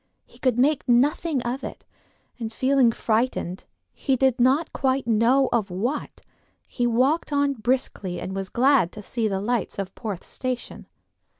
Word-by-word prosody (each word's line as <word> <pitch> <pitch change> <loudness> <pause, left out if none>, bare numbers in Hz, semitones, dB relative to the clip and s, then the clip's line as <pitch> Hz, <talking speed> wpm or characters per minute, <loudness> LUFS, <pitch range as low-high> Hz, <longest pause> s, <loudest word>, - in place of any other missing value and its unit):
He - - -21
could 255 -3 +1
make 280 +1 +2
nothing 275 +3 +2
of 245 +3 -3
it, - - -8 0.5
and 225 -2 -4
feeling 260 0 +3
frightened, 220 -5 -1 0.3
he 270 - 0
did 260 -1 +2
not 270 +6 +2
quite 265 -1 0
know 235 +4 +3
of 220 -4 +1
what, 235 +11 -3 0.5
he 245 -2 -1
walked 260 +8 +1
on 285 -1 +2
briskly 215 -6 -2
and 190 - -5
was 195 -1 -4
glad 255 -7 +3
to 210 - -9
see 225 +2 -1
the 195 -2 -1
lights 230 +2 -2
of 195 -1 -4
Porth 205 -6 -5
station. 255 -1 -5
245 Hz, 160 wpm, -24 LUFS, 220-270 Hz, 0.5 s, feeling